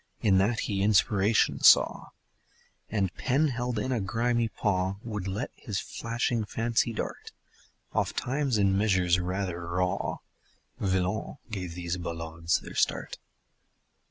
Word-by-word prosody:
In 95 -3 +4
that 110 +4 +1
he 100 -2 -1
inspiration 105 +1 +3
saw - - +6 0.8
And, 100 -4 0
pen 140 +4 +1
held 120 -2 -2
in 115 +5 -1
a 120 -4 0
grimy 115 +3 +1
paw 95 -3 -1
Would 105 -4 -4
let 100 +5 -3
his 105 -5 -4
flashing 115 0 -2
fancy 115 +2 0
dart 110 - -5 0.6
Ofttimes 135 -2 0
in 100 -2 +3
measures 95 -4 +3
rather 90 -1 -3
raw 90 +1 -1 0.6
Villon 95 +2 -1
gave 90 -5 -4
these 90 0 -3
ballades 85 -1 -2
their - - -10
start. - - 0
100 Hz, 125 wpm, -28 LUFS, 90-115 Hz, 0.8 s, saw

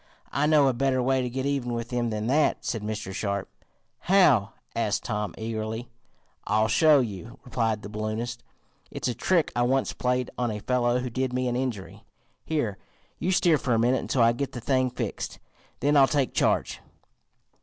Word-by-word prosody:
"I 145 +3 +1
know 150 -3 +5
a 130 - +2
better 130 +1 +1
way 130 +1 +2
to 125 - -2
get 130 +2 -3
even 135 -4 -1
with 115 0 -4
them 120 -1 -1
than 105 -1 -3
that," 145 +6 +2
said 115 - -2
Mr. 105 -2 -4
Sharp. 100 -1 -2 0.5
"How?" 150 - +4 0.2
asked 110 -3 0
Tom 105 -5 -3
eagerly. 110 +1 -4 0.6
"I'll 110 +2 +2
show 150 +3 +5
you," 115 +2 -6
replied 115 -4 -1
the - - -6
balloonist. 110 +3 -4 0.5
"It's - - -3
a 125 - 0
trick 165 +7 +1
I 120 - +1
once 130 +2 +1
played 125 0 -1
on 120 -1 +1
a 105 - -3
fellow 120 +2 +1
who 125 -1 -4
did 130 +1 -1
me 125 0 0
an 120 - -1
injury. 125 -7 -4 0.4
Here, 120 -11 -2 0.4
you 185 - 0
steer 170 -4 +4
for 125 -3 +1
a - - +2
minute 120 +2 +2
until 125 - +1
I 115 - +6
get 130 +4 -3
the 120 - -5
thing 130 +1 +1
fixed, 125 - -4 0.4
then 145 +3 +3
I'll 135 -2 +7
take 140 -3 0
charge." - - +1
120 Hz, 185 wpm, -26 LUFS, 110-135 Hz, 0.6 s, I'll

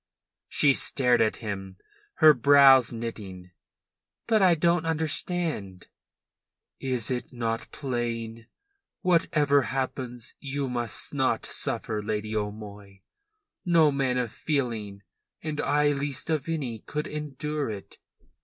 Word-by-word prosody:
She 140 -2 +4
stared 125 -3 +2
at 110 -1 +2
him, 95 -2 -5 0.4
her 155 -1 +7
brows 135 -1 +6
knitting. 100 -6 -7 0.7
"But 220 -2 +3
I 180 -3 +5
don't 170 +1 +2
understand." 160 - -1 0.9
"Is 125 -3 -2
it 125 -1 -3
not 115 -2 -3
plain? 115 -4 -4 0.5
Whatever 150 -5 +3
happens, 130 -3 -4
you 140 0 -3
must 120 -3 -4
not - - 0
suffer, 110 -2 -3
Lady 110 +1 -3
O'Moy. 105 -2 -6 0.6
No 165 -4 +4
man 135 -2 0
of 120 -3 -1
feeling, 115 -9 -2 0.4
and 155 -1 -2
I 145 0 +2
least 145 +2 -2
of 155 0 -1
any, 135 -9 -3
could 150 +7 -4
endure 150 -1 -4
it. 100 -2 -8
130 Hz, 115 wpm, -27 LUFS, 110-150 Hz, 0.9 s, her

